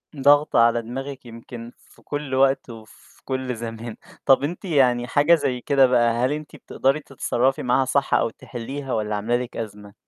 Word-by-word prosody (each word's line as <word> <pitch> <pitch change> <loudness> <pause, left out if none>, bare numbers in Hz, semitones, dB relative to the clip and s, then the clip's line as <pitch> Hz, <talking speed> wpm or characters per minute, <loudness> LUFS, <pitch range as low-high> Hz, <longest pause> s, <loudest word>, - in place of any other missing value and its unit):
ضاغطة 145 0 +4
على 115 0 +4
دماغِك 135 +3 -7
يمكن 115 0 -10
في - - -23
كُلّ 145 -2 -4
وقت 135 0 +2
وفي 110 -2 -14
كُلّ 130 -2 -3
زمان. 115 0 -7 0.3
طَب 135 0 +5
أنتِ 170 +6 -4
يعني 125 -7 +2
حاجة 150 +6 +4
زي 125 -6 -2
كده 135 0 +4
بقى، 120 -2 +3
هل 130 - 0
أنتِ 150 0 -6
بتقدري 135 +3 -1
تتصرّفي 135 -2 -1
معاها 130 +2 +2
صح، 140 +2 0
أو - - +3
تحلّيها 130 +4 -7
والَّا 105 -1 -1
عاملة 110 +4 -1
لِك 125 -1 -6
أزمة؟ 105 -2 -7
130 Hz, 175 wpm, -23 LUFS, 115-140 Hz, 0.3 s, طَب